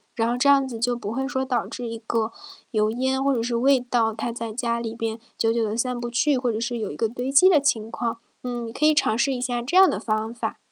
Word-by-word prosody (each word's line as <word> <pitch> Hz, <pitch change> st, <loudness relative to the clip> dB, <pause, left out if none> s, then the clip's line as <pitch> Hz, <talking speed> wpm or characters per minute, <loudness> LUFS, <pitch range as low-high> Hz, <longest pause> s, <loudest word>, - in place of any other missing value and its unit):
然 225 Hz, -1 st, +1 dB
后 240 Hz, -, 0 dB
这 275 Hz, +3 st, +3 dB
样 275 Hz, -1 st, +5 dB
子 230 Hz, -3 st, -6 dB
就 245 Hz, +1 st, +1 dB
不 210 Hz, -3 st, -5 dB
会 265 Hz, +3 st, -2 dB
说 265 Hz, -2 st, -2 dB
导 255 Hz, -2 st, -1 dB
致 245 Hz, -2 st, -6 dB
一 230 Hz, 0 st, -5 dB
个 225 Hz, -1 st, 0 dB, 0.4 s
油 215 Hz, -1 st, +2 dB
烟 260 Hz, +3 st, 0 dB
或 275 Hz, -1 st, +2 dB
者 230 Hz, -, -1 dB
是 240 Hz, 0 st, -1 dB
味 265 Hz, +2 st, +4 dB
道 240 Hz, -3 st, 0 dB
它 235 Hz, +1 st, -3 dB
在 230 Hz, -1 st, -5 dB
家 235 Hz, 0 st, -1 dB
里 230 Hz, -1 st, -5 dB
边 225 Hz, -1 st, -3 dB, 0.2 s
久 225 Hz, 0 st, +2 dB
久 230 Hz, -1 st, +1 dB
地 215 Hz, +1 st, -2 dB
散 250 Hz, 0 st, -1 dB
不 240 Hz, 0 st, -4 dB
去， 260 Hz, +3 st, +2 dB
或 250 Hz, -2 st, 0 dB
者 220 Hz, -, -3 dB
是 240 Hz, 0 st, -2 dB
有 210 Hz, -, -3 dB
一 -, -, -7 dB
个 225 Hz, -, 0 dB
堆 245 Hz, +4 st, -4 dB
积 290 Hz, +7 st, +7 dB
的 305 Hz, -6 st, +5 dB
情 225 Hz, -5 st, 0 dB
况。 230 Hz, -1 st, -2 dB, 0.2 s
嗯， 240 Hz, -2 st, -4 dB
你 225 Hz, -, -7 dB
可 300 Hz, -, -4 dB
以 305 Hz, 0 st, +5 dB
尝 220 Hz, -, +2 dB
试 270 Hz, +4 st, +1 dB
一 255 Hz, -, -2 dB
下 245 Hz, -1 st, -2 dB
这 280 Hz, +10 st, 0 dB
样 380 Hz, 0 st, +9 dB
的 -, -, -1 dB
方 220 Hz, +1 st, -2 dB
法。 240 Hz, -, -4 dB
240 Hz, 310 characters per minute, -24 LUFS, 225-260 Hz, 0.4 s, 样